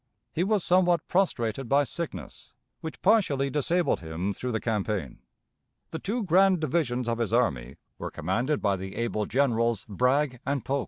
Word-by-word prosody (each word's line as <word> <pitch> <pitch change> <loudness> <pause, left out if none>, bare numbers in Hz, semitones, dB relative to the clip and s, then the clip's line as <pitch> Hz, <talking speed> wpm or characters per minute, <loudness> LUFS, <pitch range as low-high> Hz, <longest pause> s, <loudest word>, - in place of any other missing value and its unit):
He 170 - +1
was 200 -1 +1
somewhat 175 -2 +3
prostrated 130 - 0
by 140 +1 +4
sickness, 140 - -7 0.3
which 160 - -8
partially 140 -11 +3
disabled 165 +5 +1
him 85 +4 -3
through 125 +5 -4
the 110 - -1
campaign. 105 - -2 0.7
The 160 - -4
two 225 +4 -2
grand 190 0 +4
divisions 140 -7 0
of 115 0 -1
his 115 -3 -1
army 70 - 0 0.2
were - - -4
commanded 120 - -1
by 100 -2 +2
the 95 +1 -7
able 110 -3 -1
Generals 115 -4 +1
Bragg 125 +4 +1
and 140 -2 -2
Polk. 140 +1 0
125 Hz, 160 wpm, -27 LUFS, 110-160 Hz, 0.7 s, by